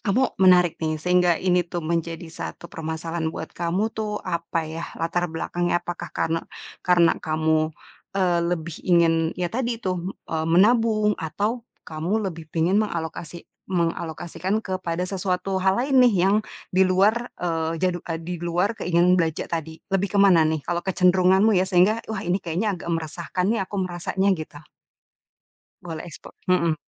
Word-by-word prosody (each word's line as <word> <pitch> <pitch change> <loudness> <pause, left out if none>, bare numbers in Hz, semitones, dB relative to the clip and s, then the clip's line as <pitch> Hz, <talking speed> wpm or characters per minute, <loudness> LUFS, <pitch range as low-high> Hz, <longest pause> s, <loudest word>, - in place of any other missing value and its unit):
kamu 245 +5 +1
menarik 180 -3 +5
nih, 155 -1 -1
sehingga 180 +1 +3
ini 180 -1 +2
tuh 170 -1 -4
menjadi 165 0 -2
satu 170 - -8
permasalahan 160 +1 -3
buat 160 0 -7
kamu 180 +6 -1
tuh 210 -1 -3
apa 170 -2 -2
ya, 160 +2 -5
latar 175 +1 -1
belakangnya 175 +2 -1
apakah 175 0 -5
karena 165 +1 0 0.4
karena 175 -2 +4
kamu, 155 0 +1 0.5
eee, 180 -3 +2
lebih 165 -2 -3
ingin 170 -2 +5 0.2
ya 175 -1 -2
tadi 240 -1 -1
itu, 190 -5 -2
m 180 - -4 0.2
eee, 160 0 -1
menabung 215 +3 +4
atau 210 +9 -2 0.2
kamu 175 +8 -2
lebih 160 -1 -11
pingin 175 +6 +2
mengalokasi 170 -3 -4 0.3
mengalokasikan 170 +2 -1
kepada 180 -2 -2
sesuatu 190 0 -2
hal 190 0 +3
lain 265 +1 +3
nih 240 -4 +5
yang 200 +2 +4 0.4
di 185 - +2
luar, 210 +6 +3
eee, 165 -1 -1
jadu 180 -1 +1
eee, 165 0 -2
di 180 +1 -4
luar 175 +4 0
keinginan 180 +1 +3
belanja 160 -1 -1
tadi. 160 -1 -3 0.2
Lebih 195 +1 +1
ke - - +3
mana 170 -5 +5
nih? 155 -2 -2
Kalau 175 0 -1
kecenderunganmu 190 +3 +4
ya 190 - 0
sehingga, 190 +5 +4
"Wah, 215 -3 -4
ini 180 +2 0
kayaknya 180 +6 -1
agak 175 -2 -7
meresahkan 170 +2 -2
nih 225 - 0
aku 205 - -5
merasanya," 185 +2 0
gitu. 155 -4 -6 1.2
Boleh 165 -3 -6
ekspo 165 - -11 0.2
hmm. 170 -3 +3
175 Hz, 160 wpm, -24 LUFS, 165-190 Hz, 1.2 s, menarik